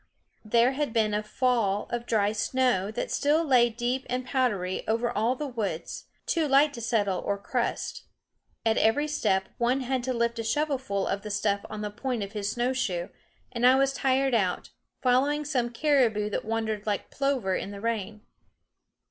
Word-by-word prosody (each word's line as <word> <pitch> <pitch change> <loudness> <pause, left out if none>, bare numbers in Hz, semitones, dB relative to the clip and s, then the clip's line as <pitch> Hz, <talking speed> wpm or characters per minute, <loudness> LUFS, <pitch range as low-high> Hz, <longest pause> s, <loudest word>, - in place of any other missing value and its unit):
There 235 +3 +3
had 280 -3 -2
been 215 -2 +2
a 210 - +1
fall 215 -2 0
of 240 0 -3
dry 210 -2 +2
snow 220 -2 +1
that 220 - -4
still 300 +3 +2
lay 250 -4 +5
deep 245 +3 -2
and 250 +1 -2
powdery 210 -9 0
over 230 +2 +1
all 225 +5 +1
the 295 - -4
woods, 210 - -4 0.2
too 325 -3 +1
light 280 +2 +4
to 235 - -7
settle 210 -5 0
or 200 - -2
crust. 235 +4 -3 0.6
At 220 0 +3
every 255 +8 +3
step 190 -10 0
one 245 +3 +2
had 260 0 -1
to 260 - -1
lift 235 0 0
a - - -2
shovelful 265 -6 -1
of 200 - -2
the 210 - -7
stuff 200 -1 0
on 215 0 -6
the 210 -1 -3
point 235 0 -3
of 200 - -7
his 210 -2 -2
snowshoe; 240 -8 -1 0.4
and 235 - -4
I 255 +1 +7
was 275 0 +2
tired 270 0 +1
out, 190 -6 0 0.3
following 280 +4 +2
some 250 -5 0
caribou 235 -6 +2
that - - -2
wandered 220 -1 -2
like 205 -2 -2
plover 270 -9 0
in - - -3
the 200 0 -8
rain. 215 -1 -3
235 Hz, 180 wpm, -27 LUFS, 210-260 Hz, 0.6 s, I